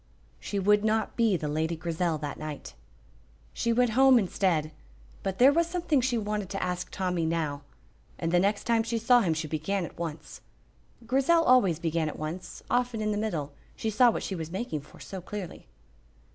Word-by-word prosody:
She 205 - -4
would 205 +2 +3
not 220 0 0
be 225 -5 +3
the 150 - -4
Lady 160 +3 -1
Grizel 165 0 -1
that 145 -1 -6
night. 155 -2 -7 0.8
She 235 - 0
went 245 0 +3
home 265 +2 +6
instead, 175 -6 +1 0.5
but 190 -1 -3
there 265 +3 +6
was 335 +1 +2
something 335 -5 +1
she 245 -1 0
wanted 210 -3 -2
to 195 - -3
ask 180 -1 -3
Tommy 180 -3 -1
now, 160 -3 -1 0.6
and 165 -1 -2
the 175 - +4
next 200 +2 +1
time 230 -1 +2
she 230 +1 -2
saw 240 +2 +4
him 165 -6 +1
she 155 0 -3
began 165 +5 -2
at - - -12
once. 160 -2 -6 0.6
Grizel 275 +7 +3
always 245 - +4
began 165 -1 -1
at - - -8
once, 170 +4 -6
often 245 -2 0
in 215 0 0
the - - -1
middle, 160 -10 -3 0.2
she 220 - -2
saw 240 +4 +5
what - - -2
she - - -3
was 165 -3 -5
making 185 -5 -3
for 145 - -17
so 190 -2 -7
clearly. 190 - -7
195 Hz, 190 wpm, -28 LUFS, 165-230 Hz, 0.8 s, home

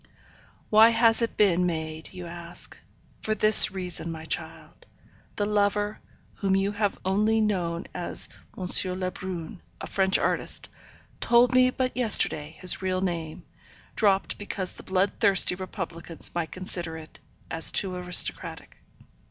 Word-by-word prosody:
Why 220 +1 +7
has 230 0 +2
it 230 - -3
been 180 -4 +2
made, 160 -1 -5
you 180 -1 -9
ask. 170 0 -9 0.5
For 215 - -2
this 215 0 +8
reason, 180 -3 -5
my 160 -1 -9
child. - - -6 0.5
The 205 - -1
lover, 205 0 -1 0.4
whom 195 -1 0
you 195 +1 0
have 205 -1 -2
only 210 +4 +1
known 180 -6 -2
as 175 - -2 0.3
M. 185 - -5 0.3
Lebrun, 185 -1 -6 0.2
a - - -7
French 190 0 +1
artist, - - -1 0.5
told 240 +1 +3
me 255 0 +4
but 255 0 -3
yesterday 165 -10 +4
his 185 - 0
real 185 -1 -2
name, 170 -2 -5 0.5
dropped 200 -3 0
because 195 -2 -4
the - - -12
blood 190 +1 0
thirsty 200 -5 +4
republicans 180 -3 -6
might 170 -2 -4
consider 175 -3 -4
it 155 -1 -13 0.3
as 165 - +3
too 190 -2 +3
aristocratic. 180 0 -1
185 Hz, 135 wpm, -25 LUFS, 175-210 Hz, 0.5 s, this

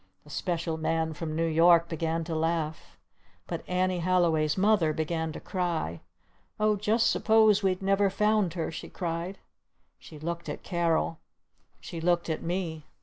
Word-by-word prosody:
The 150 - -15
Special 170 -1 -2
Man 160 0 -1
from 155 0 -5
New 165 +1 +1
York 170 +1 +5
began 165 0 -2
to 165 0 -5
laugh. 160 -1 -2 0.5
But - - -5
Annie 185 0 +1
Halliway's 165 -3 +2
Mother 190 -5 +3
began 160 +1 -2
to - - -7
cry. 170 - -2 0.6
"Oh, 215 0 +3
just 215 +3 +2
suppose 220 -2 +4
we'd 190 -1 0
never 195 +1 +3
found 210 -3 +1
her?" 165 -2 -2
she 165 - -7
cried. 175 +2 -4 0.6
She 155 - -12
looked 170 +3 -5
at - - -6
Carol. 165 -2 0 0.6
She 165 - -7
looked 170 0 +1
at 160 - -3
me. 165 -3 -3
170 Hz, 150 wpm, -28 LUFS, 160-185 Hz, 0.6 s, York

